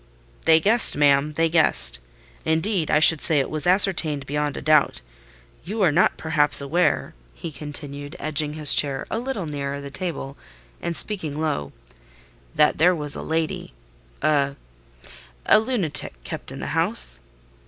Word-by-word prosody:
"They 160 Hz, 0 st, +5 dB
guessed, 220 Hz, +3 st, +4 dB
ma'am: 145 Hz, +1 st, +2 dB
they 165 Hz, +2 st, +1 dB
guessed. 60 Hz, -, +2 dB, 0.4 s
Indeed, 160 Hz, +2 st, -1 dB
I -, -, +3 dB
should 155 Hz, 0 st, +6 dB
say 155 Hz, -3 st, +3 dB
it 135 Hz, -, -3 dB
was 155 Hz, 0 st, +1 dB
ascertained 170 Hz, -7 st, +2 dB
beyond 145 Hz, +1 st, -3 dB
a -, -, -6 dB
doubt. 155 Hz, -1 st, +2 dB, 0.6 s
You 205 Hz, +5 st, -3 dB
are 170 Hz, -, +4 dB
not 170 Hz, +6 st, +2 dB
perhaps 155 Hz, -2 st, +2 dB
aware," 155 Hz, +6 st, 0 dB, 0.2 s
he 165 Hz, -, -7 dB
continued, 145 Hz, 0 st, -7 dB
edging 150 Hz, -1 st, 0 dB
his 150 Hz, -2 st, +3 dB
chair 140 Hz, -2 st, +1 dB
a 225 Hz, -, -2 dB
little 245 Hz, -7 st, -4 dB
nearer 140 Hz, -2 st, -5 dB
the 140 Hz, 0 st, -9 dB
table, 145 Hz, -3 st, -6 dB, 0.4 s
and 170 Hz, -1 st, -3 dB
speaking 160 Hz, -8 st, -3 dB
low, 145 Hz, -, -3 dB, 0.8 s
"that 150 Hz, -, +2 dB
there 175 Hz, +3 st, +4 dB
was 150 Hz, -3 st, -3 dB
a -, -, -6 dB
lady—a—a 140 Hz, -, -3 dB, 1.0 s
lunatic, 185 Hz, -, -3 dB
kept -, -, -8 dB
in -, -, -9 dB
the -, -, -5 dB
house?" -, -, -1 dB
150 Hz, 145 wpm, -22 LUFS, 140-165 Hz, 1.0 s, should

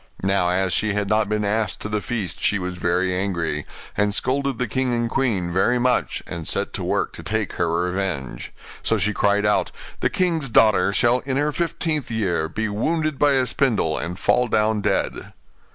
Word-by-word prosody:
Now, 95 Hz, -2 st, +2 dB
as 95 Hz, 0 st, +1 dB
she 110 Hz, -1 st, +1 dB
had 100 Hz, -1 st, -1 dB
not 105 Hz, -1 st, +2 dB
been 105 Hz, 0 st, 0 dB
asked 105 Hz, -1 st, -1 dB
to -, -, -3 dB
the 105 Hz, -1 st, -2 dB
feast 105 Hz, -9 st, -4 dB
she 100 Hz, -, +2 dB
was 90 Hz, -1 st, -4 dB
very 90 Hz, +1 st, 0 dB
angry, 85 Hz, -6 st, -2 dB, 0.3 s
and 105 Hz, 0 st, +1 dB
scolded 135 Hz, 0 st, 0 dB
the 125 Hz, -, -1 dB
king 130 Hz, -1 st, -1 dB
and 120 Hz, 0 st, 0 dB
queen 110 Hz, -9 st, 0 dB
very 110 Hz, +7 st, +3 dB
much, 125 Hz, 0 st, 0 dB
and 85 Hz, -2 st, -6 dB
set -, -, 0 dB
to -, -, -3 dB
work -, -, -1 dB
to -, -, -9 dB
take 110 Hz, -2 st, -2 dB
her 85 Hz, 0 st, 0 dB
revenge. 90 Hz, -10 st, -3 dB, 0.3 s
So -, -, +1 dB
she 105 Hz, -, 0 dB
cried 105 Hz, +1 st, +2 dB
out, 105 Hz, -, +2 dB, 0.3 s
'The -, -, +1 dB
king's 165 Hz, -7 st, 0 dB
daughter 105 Hz, -4 st, +4 dB
shall, 120 Hz, +5 st, +3 dB
in 130 Hz, +1 st, -3 dB
her 150 Hz, +1 st, +1 dB
fifteenth 160 Hz, -2 st, -2 dB
year, 90 Hz, -8 st, -1 dB
be 110 Hz, +6 st, -2 dB
wounded 155 Hz, +8 st, -1 dB
by 145 Hz, -1 st, +4 dB
a 130 Hz, -1 st, +3 dB
spindle, 115 Hz, -, +1 dB
and 85 Hz, +2 st, -4 dB
fall 125 Hz, +6 st, +2 dB
down 110 Hz, -1 st, +1 dB
dead. -, -, -1 dB
105 Hz, 195 wpm, -22 LUFS, 90-125 Hz, 0.3 s, daughter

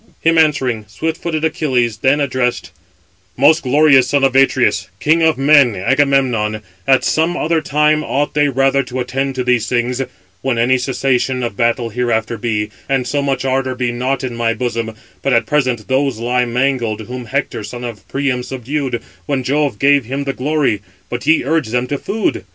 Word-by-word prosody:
Him 165 Hz, 0 st, +3 dB
answering, 130 Hz, -8 st, +1 dB
swift 160 Hz, -, -4 dB
footed 160 Hz, -2 st, -1 dB
Achilles 125 Hz, -8 st, 0 dB
then 135 Hz, +5 st, +2 dB
addressed: 130 Hz, -3 st, -1 dB, 0.7 s
"Most 150 Hz, +5 st, +5 dB
glorious 135 Hz, -1 st, +4 dB
son 140 Hz, 0 st, +1 dB
of 135 Hz, -1 st, +2 dB
Atreus, 135 Hz, -2 st, +2 dB
king 160 Hz, +2 st, +2 dB
of 160 Hz, -1 st, +3 dB
men, 135 Hz, -4 st, +5 dB
Agamemnon, 120 Hz, -2 st, +1 dB, 0.2 s
at 135 Hz, -1 st, +4 dB
some 165 Hz, +3 st, +1 dB
other 160 Hz, 0 st, 0 dB
time 150 Hz, +1 st, +2 dB
ought 145 Hz, +1 st, -1 dB
they 145 Hz, -1 st, +2 dB
rather 135 Hz, +1 st, +2 dB
to 130 Hz, -1 st, -6 dB
attend 135 Hz, +2 st, -2 dB
to 130 Hz, -, -1 dB
these 125 Hz, -2 st, +1 dB
things, 125 Hz, +1 st, 0 dB, 0.4 s
when 130 Hz, -3 st, -1 dB
any 125 Hz, +2 st, +2 dB
cessation 130 Hz, 0 st, 0 dB
of 115 Hz, -4 st, -3 dB
battle 115 Hz, +1 st, 0 dB
hereafter 115 Hz, -1 st, -1 dB
be, 105 Hz, -2 st, -2 dB, 0.2 s
and 135 Hz, -2 st, +1 dB
so 145 Hz, +3 st, 0 dB
much 135 Hz, -2 st, -1 dB
ardour 130 Hz, -1 st, 0 dB
be 125 Hz, -1 st, -1 dB
not 130 Hz, +2 st, -2 dB
in 125 Hz, -2 st, -4 dB
my 115 Hz, -1 st, 0 dB
bosom: 115 Hz, -2 st, -3 dB, 0.3 s
but 135 Hz, -, 0 dB
at 115 Hz, -, +3 dB
present 130 Hz, -7 st, 0 dB
those 135 Hz, -2 st, 0 dB
lie 125 Hz, +2 st, 0 dB
mangled, 120 Hz, -3 st, -1 dB
whom 125 Hz, +3 st, -7 dB
Hector, 135 Hz, -2 st, -3 dB
son 120 Hz, +3 st, -7 dB
of 115 Hz, -5 st, -7 dB
Priam, 135 Hz, -2 st, -1 dB
subdued, 130 Hz, 0 st, -4 dB, 0.2 s
when 140 Hz, -3 st, -1 dB
Jove 140 Hz, -2 st, 0 dB
gave 140 Hz, 0 st, +3 dB
him 135 Hz, +4 st, -3 dB
the 135 Hz, -1 st, -2 dB
glory: 140 Hz, -5 st, 0 dB, 0.3 s
but 120 Hz, +3 st, -4 dB
ye 160 Hz, +1 st, +4 dB
urge 155 Hz, 0 st, 0 dB
[them] 125 Hz, +2 st, -1 dB
to 140 Hz, +2 st, -3 dB
food! 205 Hz, -, -2 dB
130 Hz, 180 wpm, -17 LUFS, 120-140 Hz, 0.7 s, Most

